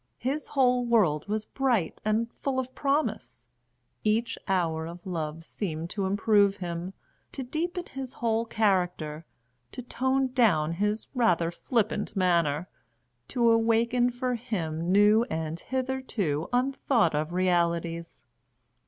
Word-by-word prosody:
His 275 +5 -2
whole 250 -3 +3
world 205 -11 +2
was 215 +1 -2
bright 240 -12 0
and 215 +2 +1
full 270 -2 -3
of 260 0 -2
promise; 285 +2 -1 0.6
each 220 +2 +1
hour 165 -4 0
of 175 +1 -10
love 165 -3 -4
seemed 165 -4 -4
to 195 -2 -1
improve 205 0 +3
him, 175 0 -5 0.4
to 270 - -4
deepen 345 +7 -3
his 265 -1 -7
whole 230 -1 0
character, 180 -8 0 0.5
to 250 - -7
tone 260 +2 0
down 180 - +3
his 210 +5 -1
rather 175 -10 +2
flippant 215 +2 -1
manner, 170 -4 +2 0.6
to 235 -2 +3
awaken 230 +2 +3
for 250 +1 -2
him 175 -8 -3
new 210 +3 +6
and 160 -2 -3
hitherto 255 - -2
unthought 250 - +2
of 155 +2 -1
realities. 170 -4 0
210 Hz, 125 wpm, -28 LUFS, 170-245 Hz, 0.6 s, new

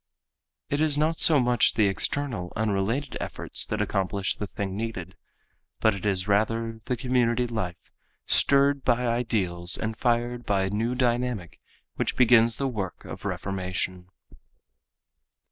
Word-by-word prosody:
It 145 +1 +1
is 155 -2 +2
not 155 +2 +1
so 155 -3 +7
much 125 -1 +3
the 110 - +4
external 100 -1 -1
unrelated 110 +6 -1
efforts - - -3
that - - -1
accomplish 95 0 -1
the 105 - -5
thing 95 -1 -4
needed, 100 -5 -5 0.6
but 110 - +3
it 100 +1 -4
is 95 -1 0
rather 115 +2 0
the 125 - -1
community 125 -1 +1
life 105 -8 -5 0.3
stirred 140 0 +3
by 125 0 +2
ideals 100 -8 0
and 110 0 -3
fired 120 +1 0
by 100 -3 +1
a 95 - -1
new 115 +4 -1
dynamic 120 - -1 0.4
which - - -1
begins 115 -2 +5
the 135 - -1
work 100 -8 -5
of - - -9
reformation. 95 -1 -3
115 Hz, 140 wpm, -26 LUFS, 95-125 Hz, 0.6 s, so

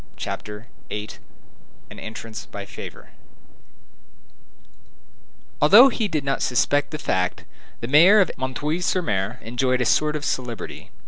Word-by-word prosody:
CHAPTER 105 +2 -6 0.2
VIII—AN 105 -1 -11
ENTRANCE 110 0 -8
BY - - -8
FAVOR - - -10 2.5
Although 215 - +8
he 230 -3 -1
did 155 -6 -2
not 135 0 -1
suspect 145 +3 +1
the 155 - -5
fact, 90 -9 -1 0.4
the 115 - -4
mayor 170 - +7
of 190 - +3
M. 130 0 -3 0.3
sur 180 -1 0
M. 100 +3 -1
enjoyed 125 +2 0
a 125 - +1
sort 150 +6 +2
of 150 -1 -4
celebrity. 120 -4 -4
130 Hz, 125 wpm, -23 LUFS, 110-155 Hz, 2.5 s, Although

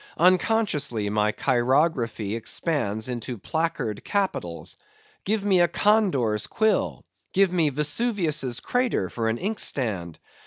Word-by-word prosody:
Unconsciously 170 - +2
my 105 0 +2
chirography 120 -4 +1
expands 110 - -1
into 120 -1 -4
placard 160 - -2
capitals. 185 - -2 0.5
Give 205 0 0
me 190 -3 +4
a 175 - +5
condor's 150 - +2
quill! 220 - 0 0.3
Give 190 -1 +3
me 165 -4 +3
Vesuvius' 150 - 0
crater 245 - 0
for 115 -1 -1
an 110 - -1
inkstand! 120 - -1
145 Hz, 110 wpm, -25 LUFS, -, 0.5 s, a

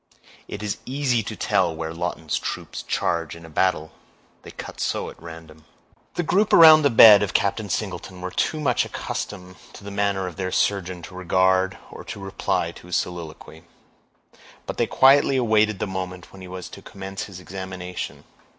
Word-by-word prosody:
It - - -7
is 105 - -3
easy 130 -3 0
to - - -6
tell 85 -3 +1
where 80 0 -5
Lawton's 80 -2 -3
troops - - -5
charge 85 -2 -2
in 85 0 -12
a 80 - -13
battle, 80 -2 0 0.5
they - - -12
cut - - -9
so - - -2
at - - -18
random." 80 -2 -11 0.5
The 175 - 0
group 195 +6 +1
around 160 -2 +9
the 145 - +4
bed 110 -4 +9
of 105 - -2
Captain 100 +1 0
Singleton 90 -1 -4
were 90 0 -5
too 155 - -1
much 125 -6 +1
accustomed 90 -2 -6 0.2
to - - -12
the 100 - -7
manner 100 -1 0
of 90 - -7
their 95 -1 -3
surgeon 90 -4 -1
to 90 - -10
regard 95 +1 +1
or - - -9
to - - -7
reply 95 -3 -2
to 85 - -15
his 90 - -2
soliloquy; 80 -2 -5 1.0
but - - -6
they - - +1
quietly 135 0 +5
awaited 110 -4 +2
the - - -2
moment 90 -2 -6
when 95 - -12
he 95 - -9
was 90 0 -7
to - - -11
commence 95 0 -7
his 95 -3 -10
examination. 90 -1 -7
95 Hz, 180 wpm, -23 LUFS, 90-105 Hz, 1.0 s, around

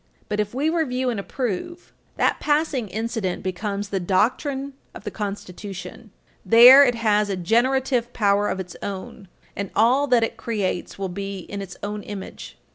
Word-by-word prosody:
But 210 0 -2
if 210 +2 -2
we 285 +4 0
review 260 -6 0
and 225 - -3
approve, 255 - -4 0.2
that - - +2
passing 295 -6 0
incident 215 -2 -3
becomes 200 +2 -3
the 195 - -1
doctrine 260 - 0 0.2
of - - -10
the 210 - -5
Constitution. 200 -2 -7 0.3
There 245 +5 +9
it 245 -3 +2
has 210 -2 +2
a 195 - -1
generative 240 +5 +1
power 205 -2 +2
of 190 - -3
its 180 -2 -7
own, 195 0 -7 0.3
and 200 -1 -4
all 255 +6 +4
that 245 -3 +4
it 225 - -2
creates 200 -6 -3
will 195 -1 -3
be 195 +1 -5
in 200 +3 -7
its 190 -2 -8
own 210 +1 -4
image. 205 -2 -8
210 Hz, 165 wpm, -23 LUFS, 195-250 Hz, 0.3 s, There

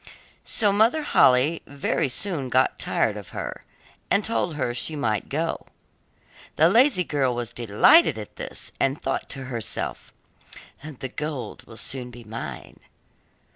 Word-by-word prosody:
So 205 -3 +3
Mother 230 +9 +3
Holle 140 - +4
very 140 +1 -1
soon 145 -2 -1
got 130 +1 +2
tired - - 0
of - - -9
her, - - -5 0.5
and 200 - +2
told 180 -7 -1
her 125 -4 -1
she 155 +5 -3
might 110 -8 -1
go. 165 +3 -2 0.9
The - - +5
lazy 240 -5 +5
girl 135 -6 0
was 120 -1 -4
delighted 120 - +5
at 105 -2 -9
this, - - -4
and 135 +2 +1
thought 135 - -3
to 135 -1 -4
herself, 120 -4 -4 0.7
'The 140 -3 -7
gold 150 -1 -6
will 110 - -12
soon 125 +2 -4
be 120 0 -12
mine. 110 +1 -8
135 Hz, 140 wpm, -24 LUFS, 125-165 Hz, 0.9 s, The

